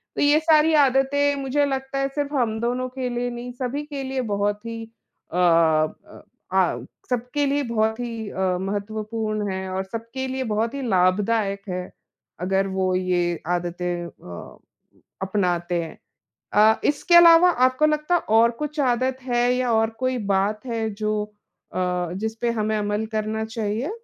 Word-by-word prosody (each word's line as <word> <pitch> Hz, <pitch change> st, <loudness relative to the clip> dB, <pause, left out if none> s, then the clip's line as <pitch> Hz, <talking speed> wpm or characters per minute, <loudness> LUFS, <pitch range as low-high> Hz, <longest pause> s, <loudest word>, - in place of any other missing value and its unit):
तो -, -, -1 dB
ये 290 Hz, +1 st, +5 dB
सारी 315 Hz, 0 st, +4 dB
आदतें 280 Hz, +2 st, +2 dB
मुझे 280 Hz, +2 st, +1 dB
लगता 270 Hz, 0 st, -3 dB
है 275 Hz, -, +1 dB
सिर्फ 290 Hz, 0 st, -2 dB
हम 230 Hz, -5 st, 0 dB
दोनों 250 Hz, +2 st, -1 dB
के 255 Hz, 0 st, -4 dB
लिए 245 Hz, 0 st, -2 dB
नहीं, 240 Hz, +1 st, -6 dB
सभी 255 Hz, +3 st, -3 dB
के 285 Hz, -2 st, -5 dB
लिए 265 Hz, 0 st, -2 dB
बहुत 205 Hz, +2 st, -1 dB
ही 230 Hz, 0 st, -5 dB, 0.5 s
अ -, -, -1 dB
अ 165 Hz, -3 st, +2 dB, 0.3 s
आ -, -, +2 dB, 0.3 s
सबके 250 Hz, +4 st, -1 dB
लिए 285 Hz, +1 st, +1 dB
बहुत 220 Hz, -2 st, 0 dB
ही 230 Hz, -3 st, -4 dB
अ, 185 Hz, -2 st, -1 dB
महत्वपूर्ण 215 Hz, +1 st, -3 dB
हैं 190 Hz, 0 st, -4 dB
और 190 Hz, +1 st, -2 dB
सबके 230 Hz, +6 st, -5 dB
लिए 260 Hz, 0 st, -2 dB
बहुत 225 Hz, +3 st, 0 dB
ही 280 Hz, -, -4 dB
लाभदायक 200 Hz, +2 st, +2 dB
है, 180 Hz, 0 st, -4 dB, 0.5 s
अगर 195 Hz, +2 st, +1 dB
वो 190 Hz, -1 st, 0 dB
ये 175 Hz, -2 st, 0 dB
आदतें 175 Hz, 0 st, -2 dB
अ, 90 Hz, -, -11 dB, 0.6 s
अपनाते 180 Hz, -3 st, 0 dB
हैं। 160 Hz, -, -9 dB, 0.6 s
अ, 215 Hz, +1 st, +5 dB
इसके 300 Hz, +4 st, +2 dB
अलावा 340 Hz, +1 st, +8 dB, 0.2 s
आपको 255 Hz, +4 st, +2 dB
लगता 305 Hz, +3 st, +1 dB
है 350 Hz, -, +3 dB, 0.2 s
और 230 Hz, +1 st, +5 dB
कुछ 300 Hz, +1 st, -4 dB
आदत 255 Hz, 0 st, +1 dB
है 245 Hz, -1 st, +1 dB
या 250 Hz, -1 st, 0 dB
और 225 Hz, 0 st, +2 dB
कोई 255 Hz, 0 st, 0 dB, 0.2 s
बात 210 Hz, +5 st, 0 dB
है 225 Hz, -2 st, -2 dB
जो, 215 Hz, 0 st, -2 dB, 0.5 s
अ 180 Hz, -1 st, -1 dB
जिसपे 225 Hz, +2 st, -1 dB
हमें 215 Hz, -1 st, -1 dB
अमल 205 Hz, +1 st, -1 dB
करना 215 Hz, 0 st, -1 dB
चाहिए? 220 Hz, -, -3 dB
225 Hz, 160 wpm, -23 LUFS, 195-260 Hz, 0.6 s, अलावा